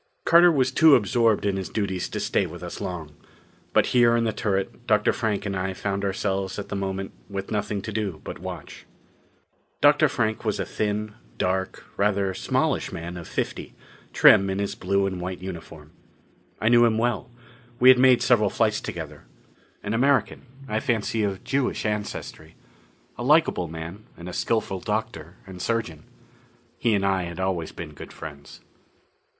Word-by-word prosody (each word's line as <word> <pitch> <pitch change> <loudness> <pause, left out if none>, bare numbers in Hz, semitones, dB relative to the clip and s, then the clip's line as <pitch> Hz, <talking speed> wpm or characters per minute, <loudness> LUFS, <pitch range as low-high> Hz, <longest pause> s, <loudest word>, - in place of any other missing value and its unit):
Carter 170 +1 +7
was 135 -5 +2
too 160 -3 +7
absorbed 110 0 +2
in 100 -1 +1
his 95 - -4
duties 95 -4 -2
to - - -4
stay - - 0
with - - -10
us - - -7
long. 80 -4 -5 0.6
But - - +4
here 120 -1 +5
in 115 - +2
the 110 -2 0
turret 100 +4 -2
Dr. 105 -2 +3
Frank 110 -3 -1
and 100 -1 -2
I 95 0 -2
found 100 0 -2
ourselves 95 -1 -2
at 100 -1 -6
the - - -3
moment 95 0 -3 0.2
with 100 -1 -5
nothing 105 -1 -1
much 100 - -5
to 110 - -4
do 100 -7 -3
but - - -7
watch. - - -8 0.9
Dr. 145 +1 +5
Frank 110 -5 -1
was - - -1
a - - -1
thin, 105 0 -2 0.2
dark, 95 +1 -2
rather 100 -1 +1
smallish - - 0
man 85 +2 -6
of 85 -2 -8
fifty, - - -4 0.4
trim 95 0 +6
in 95 - -2
his 100 0 -2
blue 100 +1 0
and 95 -2 -3
white 90 +1 -4
uniform. 85 -4 -9 0.7
I 110 - 0
knew 120 0 +6
him 115 -2 +3
well: 120 -2 -1 0.5
we 125 - +7
had 130 -1 +8
made 130 -1 +5
several 110 -5 +4
flights - - +1
together. - - -7 0.6
An 100 - -2
American 135 +2 +1 0.2
I 110 -2 -1
fancy 110 -1 -1
of 100 -2 -2
Jewish 135 -4 -1
ancestry. 105 -6 -4 0.6
A - - -3
likable 150 - +3
man, 80 +6 -8
and 85 - -9
a 90 - -6
skillful 110 -4 -1
doctor 105 -5 -4
and 95 -2 -9
surgeon. 90 -10 -2 0.7
He 115 -3 +2
and 100 -1 0
I 95 -2 +1
had 85 +1 -7
always 95 -4 -1
been 80 -3 -8
good - - -10
friends. 75 -2 -10
100 Hz, 175 wpm, -25 LUFS, 95-115 Hz, 0.9 s, had